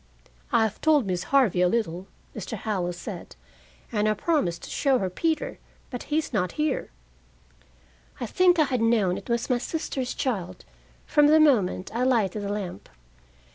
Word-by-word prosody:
"I -, -, +4 dB
have 215 Hz, -1 st, -3 dB
told 300 Hz, -6 st, +4 dB
Miss 180 Hz, -1 st, -2 dB
Harvey 250 Hz, -10 st, +3 dB
a 180 Hz, -, +5 dB
little," 185 Hz, -3 st, -1 dB, 0.3 s
Mr. 215 Hz, +2 st, -5 dB
Howell 190 Hz, -4 st, -2 dB
said, 175 Hz, -, -8 dB, 0.6 s
"and 215 Hz, -2 st, +1 dB
I 215 Hz, -, +1 dB
promised 210 Hz, -, 0 dB
to -, -, -8 dB
show 270 Hz, -2 st, +2 dB
her 190 Hz, -5 st, -2 dB
Peter, 330 Hz, -, -1 dB, 0.3 s
but 245 Hz, -, -5 dB
he 300 Hz, -, +1 dB
is 315 Hz, -4 st, -2 dB
not 185 Hz, -4 st, 0 dB
here." 300 Hz, -2 st, -1 dB, 1.3 s
I 245 Hz, -, -2 dB
think 360 Hz, +8 st, +3 dB
I 310 Hz, -, +5 dB
had 255 Hz, -5 st, -1 dB
known 220 Hz, -6 st, +2 dB
it -, -, -9 dB
was 235 Hz, 0 st, 0 dB
my 250 Hz, -2 st, +1 dB
sister's 265 Hz, -2 st, -3 dB
child 185 Hz, -8 st, -3 dB, 0.4 s
from 295 Hz, -1 st, +4 dB
the 310 Hz, +1 st, +6 dB
moment 220 Hz, -12 st, +2 dB
I 235 Hz, -, -1 dB
lighted 220 Hz, -6 st, +1 dB
the 200 Hz, -, -4 dB
lamp. 200 Hz, -, -5 dB
230 Hz, 175 wpm, -26 LUFS, 190-280 Hz, 1.3 s, the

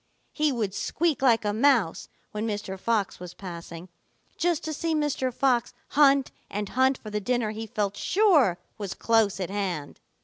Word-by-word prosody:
He 305 Hz, -1 st, +2 dB
would 220 Hz, -7 st, -2 dB
squeak 315 Hz, +4 st, 0 dB
like 235 Hz, -5 st, +4 dB
a 205 Hz, -, +1 dB
mouse 230 Hz, -7 st, +2 dB, 0.2 s
when 215 Hz, +1 st, -3 dB
Mr. 205 Hz, -3 st, -4 dB
Fox 215 Hz, -2 st, 0 dB
was 180 Hz, -1 st, -9 dB
passing, 170 Hz, -2 st, -8 dB, 0.5 s
just 345 Hz, -3 st, 0 dB
to 315 Hz, -, -3 dB
see 325 Hz, +2 st, -1 dB
Mr. 295 Hz, -4 st, 0 dB
Fox 245 Hz, -1 st, +1 dB
hunt 275 Hz, -2 st, +4 dB, 0.2 s
and 205 Hz, 0 st, -3 dB
hunt 260 Hz, +1 st, +2 dB
for 215 Hz, -, -10 dB
the 210 Hz, 0 st, -2 dB
dinner 240 Hz, 0 st, 0 dB
he 220 Hz, +1 st, -6 dB
felt 205 Hz, -1 st, -2 dB
sure 315 Hz, -, +3 dB, 0.2 s
was 200 Hz, -3 st, -4 dB
close 225 Hz, -4 st, +2 dB
at 185 Hz, -1 st, -3 dB
hand. 185 Hz, -8 st, -3 dB
225 Hz, 170 wpm, -26 LUFS, 200-275 Hz, 0.5 s, like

